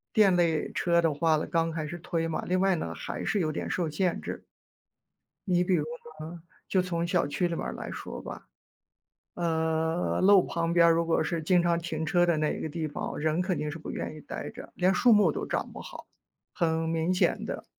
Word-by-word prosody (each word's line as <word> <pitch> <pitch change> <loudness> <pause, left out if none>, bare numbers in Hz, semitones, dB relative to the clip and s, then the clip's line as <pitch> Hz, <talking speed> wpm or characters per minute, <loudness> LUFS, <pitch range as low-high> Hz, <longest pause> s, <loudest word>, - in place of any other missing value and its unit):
电 200 -4 +6
类 165 -3 +1
车 170 -1 +2
的 165 -3 +2
话 160 +1 +2
呢， 155 - -1
刚 165 0 0
开 160 -1 -3
始 175 +3 -6
推 165 0 -2
嘛。 165 - -2
另 185 +1 +2
外 195 -1 +4
呢， - - -4
还 - - -5
是 205 -3 +1
有 155 -1 0
点 - - -4
受 170 -4 -1
限 175 +4 0
制。 - - -6 1.0
你 180 -1 +3
比 180 0 +2
如 150 -2 0 0.3
呢， 165 +2 -8 0.3
就 185 - +2
从 170 -2 -2
小 175 -5 +1
区 175 +5 0
里 170 - -3
面 - - -3
儿 - - -3
来 - - -6
说 - - -7
吧。 - - -9 0.9
呃， 160 0 0
路 195 -1 +7
旁 170 0 -1
边 170 -1 +6
如 165 0 +2
果 165 -1 +2
是 165 0 -2
经 175 +2 +3
常 170 -1 +2
停 160 -2 -3
车 175 +2 +3
的 170 -2 +2
那 150 0 0
个 160 - -3
地 155 0 -3
方， 145 - -5
人 155 +3 +1
肯 185 -1 -1
定 150 -1 -2
是 160 - -6
不 - - -8
愿 155 - -4
意 155 - -10
待 - - -6
着， 245 - -11
连 185 +1 +3
树 240 +5 +4
木 200 -7 +5
都 - - -4
长 - - -2
不 - - -9
好， - - -10 0.5
很 160 -1 0
明 165 +2 +1
显 180 - +1
的。 - - -5
170 Hz, 240 characters per minute, -28 LUFS, 160-180 Hz, 1.0 s, 路